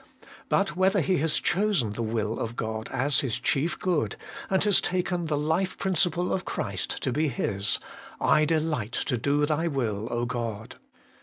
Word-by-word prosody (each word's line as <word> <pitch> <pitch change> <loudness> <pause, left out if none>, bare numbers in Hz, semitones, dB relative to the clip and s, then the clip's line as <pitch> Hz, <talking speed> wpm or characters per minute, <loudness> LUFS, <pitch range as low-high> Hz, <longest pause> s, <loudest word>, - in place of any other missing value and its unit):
But 195 -5 +1
whether 190 +2 +3
he 185 +3 +2
has 160 0 +1
chosen 185 - +1
the 115 - -4
will 110 -1 -1
of 115 +1 -3
God 110 -1 -4
as 135 +2 +2
his 125 -5 0
chief 155 +5 0
good, 155 - 0 0.3
and 190 -1 +2
has 205 -3 +4
taken 180 -1 -1
the 150 -1 0
life 160 +6 0
principle 180 -2 +1
of 190 - -1
Christ 95 -3 -3
to 130 - +1
be 155 +5 +1
his: 105 -6 0 0.4
'I 155 - +4
delight 150 -8 0
to 130 - 0
do 145 +4 +2
Thy 155 +2 0
will, 115 -8 -1 0.2
God.' 115 -3 -4
150 Hz, 165 wpm, -27 LUFS, 115-175 Hz, 0.4 s, has